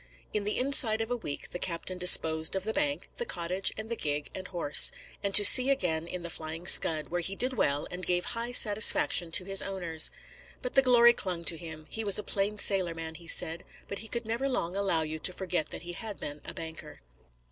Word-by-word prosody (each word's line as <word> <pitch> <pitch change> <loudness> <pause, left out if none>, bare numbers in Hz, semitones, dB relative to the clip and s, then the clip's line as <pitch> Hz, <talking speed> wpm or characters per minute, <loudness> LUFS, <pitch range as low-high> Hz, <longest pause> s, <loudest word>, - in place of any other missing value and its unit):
In 210 -1 -2
the 210 - -3
inside 250 -4 +2
of 225 +1 -4
a - - 0
week 150 -12 -8
the 175 - -6
captain 180 +1 -4
disposed 160 -2 +4
of 190 - -3
the 220 +2 -2
bank, 290 +1 -3
the 480 - -3
cottage, 180 - -2
and 215 +1 -6
the 235 - -3
gig 145 -6 -4
and 185 -1 -8
horse; 170 -5 +5 0.3
and 200 -1 -2
to 205 - +7
sea 255 +4 +8
again 170 -11 -1
in 180 0 -7
the 170 - -7
Flying 160 +2 -7
Scud, 155 -3 +4
where 175 +1 -3
he 195 +3 0
did 255 +5 -1
well 145 - 0
and 180 +1 -8
gave 180 0 -1
high 235 +1 -4
satisfaction 210 -6 +3
to 180 - +1
his 195 0 0
owners. 175 -5 0 0.5
But 250 - -5
the 270 - +5
glory 240 -2 +5
clung 180 -6 -3
to 165 - 0
him; 160 -2 -10
he 225 +8 -5
was 200 -2 +4
a 210 - -2
plain 200 +1 -2
sailor 185 -4 +1
man, 160 0 -7
he 165 +1 -14
said, 165 +1 +1 0.2
but 200 - -6
he 225 - -9
could 235 +1 -5
never 235 +5 -3
long 180 -8 -3
allow 195 -5 -1
you 155 0 -6
to 180 - +2
forget 180 -4 -3
that - - -9
he 175 0 -8
had 210 +2 -7
been 145 0 -8
a - - -8
banker. 160 - -9
185 Hz, 230 wpm, -28 LUFS, 165-220 Hz, 0.5 s, sea